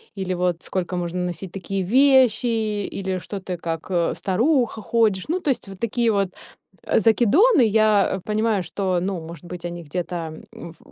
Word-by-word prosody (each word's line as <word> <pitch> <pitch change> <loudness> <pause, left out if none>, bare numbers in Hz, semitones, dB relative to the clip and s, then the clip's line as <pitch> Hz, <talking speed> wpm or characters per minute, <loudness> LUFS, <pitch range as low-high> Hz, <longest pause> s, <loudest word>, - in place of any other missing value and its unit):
или 190 -2 -2
вот 180 -1 -1
сколько 185 -1 -3
можно 175 0 -3
носить 175 +1 -5
такие 195 0 -3
вещи, 255 +2 +4 0.4
или 190 -1 -3
что 195 +2 -7
ты 185 -1 -5
как, 165 +1 -5
э, 170 -2 +1
старуха 235 +3 +1
ходишь. 215 -4 +1
Ну, 350 +4 -1
то 300 - -1
есть 260 - -1
вот 195 -1 -10
такие 235 +1 0
вот, 200 -2 +1 0.5
э, - - +2
закидоны. 265 - +4
Я 215 -3 +3
понимаю, 215 -2 0
что, 185 +1 -1
ну, 190 0 -2
может 165 0 -10
быть, 175 0 -8
они 175 0 -5
где-то, 175 +3 -4 0.4
м, 170 - -9
в - - -22
195 Hz, 175 wpm, -22 LUFS, 180-225 Hz, 0.5 s, вещи